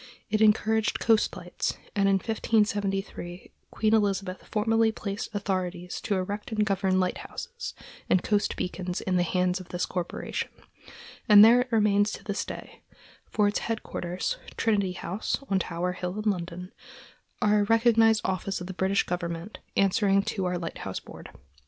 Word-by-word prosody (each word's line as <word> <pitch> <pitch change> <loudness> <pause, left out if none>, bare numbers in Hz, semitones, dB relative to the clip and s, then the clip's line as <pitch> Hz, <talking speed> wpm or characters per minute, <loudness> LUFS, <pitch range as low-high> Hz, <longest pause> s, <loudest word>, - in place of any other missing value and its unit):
It 215 0 +1
encouraged 220 0 +3
coast 220 -1 +2
lights, - - -3 0.2
and 195 -1 +3
in 195 - +4
1573 200 -4 -1 0.2
Queen 215 0 +1
Elizabeth 195 -3 0
formally 225 +1 +3
placed 200 -2 -4
authority 185 -3 -2
to 200 - -2
erect 200 +4 -3
and 215 -1 +1
govern 190 -2 +1
lighthouses 475 - -4 0.3
and 180 - +3
coast 205 -2 +1
beacons 180 -1 -3
in 185 -1 0
the - - +3
hands 180 +1 +1
of 185 - -11
this 175 0 -1
corporation, 180 -2 -3 0.8
and 210 0 +10
there 240 +2 +7
it 250 0 -5
remains 210 -2 +3
to - - -8
this 205 -1 -2
day; - - -9 0.5
for 210 -2 +2
its 205 - 0
headquarters, 180 -5 -3 0.2
Trinity 200 -5 +1
House, 190 +3 -2
on 195 - +3
Tower 175 0 -2
Hill, 180 +1 -4
in 210 - +4
London, 180 0 -6 0.7
are 210 -2 +3
a - - +3
recognized 225 -1 +4
office 190 +1 -1
of 180 - -6
the 190 - -6
British 190 +2 +1
government, 170 +2 -4 0.2
answering 195 0 +3
to 195 -2 -2
our 180 0 0
Lighthouse 170 -1 -5
Board. - - -12
195 Hz, 155 wpm, -27 LUFS, 180-215 Hz, 0.8 s, and